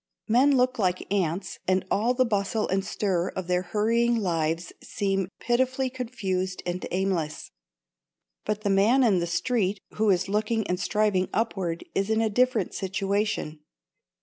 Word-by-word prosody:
Men 260 +5 +4
look 255 0 +1
like 185 0 0
ants 185 -1 -1
and 185 0 +2
all 235 +5 +2
the 255 0 +3
bustle 215 0 0
and 190 +1 0
stir 190 -3 -1
of 185 - -3
their 180 0 +1
hurrying 225 +6 +1
lives 165 -4 -1
seems 195 -2 -1
pitifully 260 +2 0
confused 195 -8 -3
and 180 +1 -3
aimless. 180 -5 -2 0.9
But 210 0 -2
the 205 -2 0
man 220 +7 +4
in 205 -7 +4
the 170 - -1
street 200 +2 0
who 215 0 +1
is 190 0 +2
looking 215 +2 0
and 180 0 -1
striving 200 -2 +1
upward 190 -7 -1
is 195 +2 0
in 220 0 +2
a 225 -1 +1
different 245 -3 +1
situation. 195 -4 -2
200 Hz, 150 wpm, -26 LUFS, 185-225 Hz, 0.9 s, Men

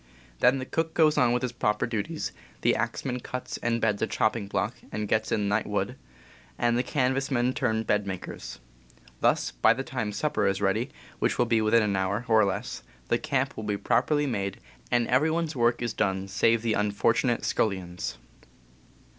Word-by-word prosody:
Then 125 +2 +5
the 130 - -4
cook 160 +3 -2
goes 155 -2 +5
on 125 -2 +4
with 125 +1 0
his 125 - -1
proper 105 -3 0
duties, 120 +8 -3 0.3
the - - +3
axeman 125 -2 -2
cuts 125 +1 -5
and 115 0 0
beds 105 -3 +1
a 110 - +2
chopping 110 -1 0
block 105 +3 -1 0.2
and 105 0 -3
gets 110 +1 0
in 105 -1 +1
night 105 +2 +1
wood, - - -1 0.6
and 120 0 +2
the 120 - +3
canvas 135 0 0
men 125 -1 +1
turn 110 -4 0
bed 105 -2 0
makers. 95 -2 -6 0.6
Thus, - - +2
by - - +4
the 135 - -3
time 125 -6 -3
supper 150 +8 0
is 95 0 +1
ready, 105 +6 +1 0.3
which - - +1
will 120 - +3
be 115 -1 +2
within 110 +1 +4
an 100 -2 0
hour, 95 +5 -1
or 110 -1 +5
less, 100 -1 -2 0.3
the - - +2
camp - - -1
will 110 - -6
be 105 -1 -1
properly 140 +8 +2
made, 100 -7 -2 0.3
and 120 -1 +2
every 130 +6 +3
one's 160 -1 -1
work 120 -1 +2
is 120 -2 -1
done 95 -2 0
save 115 +3 +2
the 115 -2 +1
unfortunate 105 +4 +1
scullion's. 90 - -1
115 Hz, 190 wpm, -27 LUFS, 105-125 Hz, 0.6 s, Then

